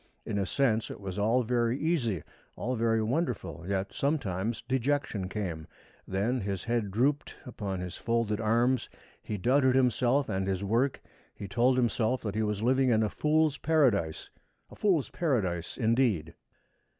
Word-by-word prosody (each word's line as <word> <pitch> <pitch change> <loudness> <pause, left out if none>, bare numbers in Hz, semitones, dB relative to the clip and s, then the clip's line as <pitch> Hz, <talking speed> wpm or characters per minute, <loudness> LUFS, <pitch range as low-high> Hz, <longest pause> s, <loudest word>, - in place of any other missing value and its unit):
In 100 - -2
a 95 - -1
sense 115 -4 +1
it - - -7
was 100 0 -5
all 115 +5 +3
very 120 +1 +1
easy, 130 - 0 0.3
all 130 +1 -2
very 115 -1 +1
wonderful, 110 - -2
yet 100 0 -2
sometimes 115 - -1
dejection 130 -6 -1
came. 85 -7 -4 0.4
Then 110 +7 0
his 100 -1 -3
head 115 -3 -1
drooped 135 +8 0
upon 100 -6 -4
his 90 -1 -6
folded 115 -2 0
arms, 120 +3 +2 0.3
he 105 - -4
doubted 130 +5 +3
himself 130 +2 +2
and 95 0 -1
his 95 0 -1
work, 120 +7 +1 0.4
he 100 - -7
told 120 +5 +2
himself 120 0 +1
that 105 -3 -3
he 110 - -1
was 105 -1 -1
living 130 +2 +3
in 110 -2 +3
a 105 - +1
fool's 155 +1 +1
Paradise 120 - +1 0.4
a - - -11
fool's 180 -9 +1
Paradise 95 - -1
indeed! 115 -9 +1
115 Hz, 155 wpm, -29 LUFS, 100-130 Hz, 0.4 s, all